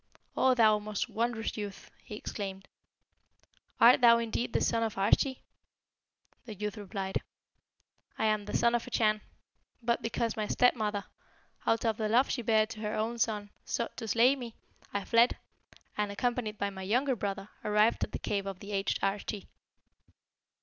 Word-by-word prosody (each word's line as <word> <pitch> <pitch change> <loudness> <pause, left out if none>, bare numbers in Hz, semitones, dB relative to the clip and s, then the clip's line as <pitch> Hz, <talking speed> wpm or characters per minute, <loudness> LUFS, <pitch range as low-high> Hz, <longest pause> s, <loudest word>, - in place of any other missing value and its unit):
'O 260 -1 +4
thou 215 -3 +5
most 210 -1 -3
wondrous 230 0 -2
youth!' 205 -2 -7
he 210 - -8
exclaimed, 195 -2 -6 1.1
'art 240 +3 +7
thou 235 -1 +8
indeed 235 +1 -2
the - - +1
son 230 - +1
of 225 -2 -1
Arschi?' 225 +7 +2 1.0
The 220 -3 -7
youth 210 +1 -4
replied, 195 -2 -4 1.0
'I - - 0
am 215 -1 +1
the - - -1
Son 235 0 +3
of 240 +1 0
a - - -6
Chan. 215 -3 +2 0.6
But 235 0 +1
because 230 0 -1
my 215 -1 -2
stepmother, 215 -5 +2 0.6
out 225 +1 +2
of 220 -2 +1
the 215 -1 -1
love 245 +5 +3
she 250 - -1
bare 220 -1 +3
to 220 0 -9
her 210 -1 -3
own 230 +2 -2
son, 210 -2 -1
sought 235 - -3
to 225 - -5
slay 235 +5 +4
me, 240 -4 -8 0.4
I 200 -1 -3
fled, 235 +1 +4 0.6
and, 210 -1 -1
accompanied 230 0 -2
by 200 0 -1
my 190 -1 -8
younger 250 +8 +1
brother, 195 -1 -4
arrived 210 +2 +3
at - - -3
the - - -3
cave 200 -1 -2
of 195 -2 -5
the 205 - -9
aged 195 -1 0
Arschi.' 200 +1 -2
215 Hz, 170 wpm, -30 LUFS, 205-235 Hz, 1.1 s, thou